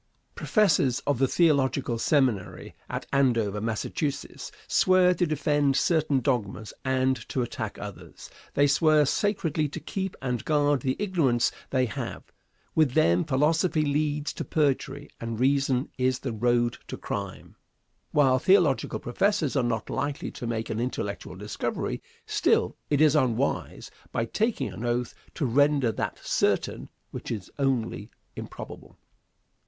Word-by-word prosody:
Professors 160 - +2
of 140 -4 +1
the 135 - +4
theological 135 -6 +2
seminary 125 -9 0 0.2
at - - -4
Andover, 115 -7 +2
Massachusetts, 115 +6 -3 0.2
swear 185 -1 +4
to 175 -1 0
defend 145 -2 +1
certain 155 -3 +2
dogmas 110 -5 -2
and 130 0 +2
to 130 - 0
attack 120 - -5
others. - - -9 0.3
They 145 - +5
swear 150 +1 +4
sacredly 165 -4 0
to - - -6
keep 190 -1 -4
and 125 -4 -2
guard 145 -3 +2
the 130 0 0
ignorance 165 - +1 0.2
they 130 -1 +2
have. 115 - -5 0.5
With 155 -6 +3
them, 85 +2 +4
philosophy 155 +3 +2
leads 150 0 0
to - - -4
perjury, 145 -1 0
and 115 -1 -4
reason 135 0 +1
is 130 0 +2
the 125 -3 -4
road 120 +1 +1
to - - -6
crime. 100 -1 -6 0.6
While 135 -3 +4
theological 175 - +3
professors 165 - 0
are 135 - +3
not 120 -2 -1
likely 140 +1 -3
to 120 - -6
make 115 -1 -3
an 110 - -2
intellectual 110 -4 -4
discovery, - - -3 0.2
still - - +1
it 145 0 +2
is 155 -1 +5
unwise, 130 -2 0 0.2
by 115 - -1
taking 220 - -1
an 115 - -7
oath, 120 0 -1 0.2
to 150 - -1
render 140 0 +3
that - - -3
certain - - 0 0.2
which - - -7
is 100 -6 -5
only 130 -5 -1 0.3
improbable. - - -9
135 Hz, 135 wpm, -27 LUFS, 120-150 Hz, 0.6 s, They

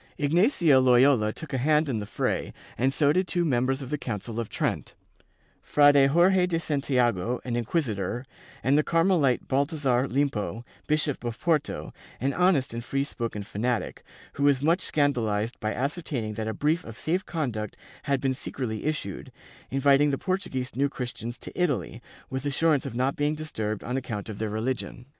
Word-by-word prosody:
Ignatius 160 - +4
Loyola 125 -3 +5
took 155 +5 -8
a 130 - 0
hand 150 +3 +3
in 120 -5 -1
the 105 - -5
fray - - -2 0.2
and 130 +2 +1
so 145 +1 +3
did 185 +2 +1
two 175 -1 0
members 130 -1 +1
of 130 - -8
the 150 - -1
Council 115 -1 -4
of 115 - -3
Trent, - - -2 0.7
Frade 145 -2 +5
Jorje 180 +4 +4
de 165 -2 0
Santiago, 125 - 0
an 120 -2 -2
inquisitor, 120 - -1 0.4
and 135 +2 +3
the 150 - +4
Carmelite 165 -7 +2
Balthazar 140 -2 +1
Limpo, 120 -6 -1 0.2
Bishop 150 -3 0
of 120 -1 -4
Porto, 155 -4 -1 0.3
an 135 +3 0
honest 180 -9 +2
and 115 0 -4
free 135 +3 -1
spoken 115 -6 -4
fanatic, 115 +3 -2 0.3
who 140 - -3
was 140 -2 +4
much 170 +4 +3
scandalized 115 -6 0
by 110 - -1
ascertaining 135 -5 -3
that 110 +1 -4
a 110 - -2
brief 155 +7 +1
of 110 -1 -9
safe 180 +5 -1
conduct 120 - -3 0.2
had 140 -2 0
been 135 0 0
secretly 125 -3 -5
issued, 150 - -3 0.4
inviting 140 +2 +4
the 135 - 0
Portuguese 140 -9 -3
New 140 +2 +2
Christians 120 -2 -6
to - - -9
Italy, 145 - -1 0.3
with 130 0 -4
assurance 150 0 +2
of - - -7
not 130 +3 +1
being 145 +1 0
disturbed 110 -9 -4
on 125 +2 -2
account 115 -5 -5
of 105 - -6
their 110 -1 -1
religion. 120 +3 -3
135 Hz, 170 wpm, -27 LUFS, 120-150 Hz, 0.7 s, Loyola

